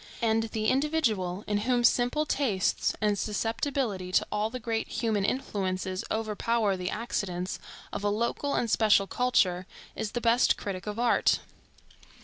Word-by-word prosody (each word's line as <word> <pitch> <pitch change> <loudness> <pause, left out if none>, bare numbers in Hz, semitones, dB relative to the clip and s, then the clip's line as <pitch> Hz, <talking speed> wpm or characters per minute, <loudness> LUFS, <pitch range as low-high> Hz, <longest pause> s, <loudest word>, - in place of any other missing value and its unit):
And 225 -1 +2
the 220 0 -2
individual, 225 - +1
in 205 0 0
whom 245 +2 +1
simple 245 +6 +3
tastes 225 -11 0
and 210 -2 +1
susceptibility 225 -2 -2
to - - +4
all 210 +1 0
the 255 +2 -6
great 225 -1 -2
human 220 -4 -1
influences 190 -4 -2
overpower 220 -1 0
the 180 -1 -3
accidents 185 -5 -3 0.3
of - - -4
a 205 - +2
local 235 +6 -1
and 235 - +1
special 215 -3 +4
culture, 195 -6 +1 0.3
is 210 - -4
the 240 - 0
best 235 +1 +3
critic 190 -1 -5
of 210 0 -4
art. 240 0 +3
220 Hz, 145 wpm, -28 LUFS, 195-240 Hz, 0.3 s, to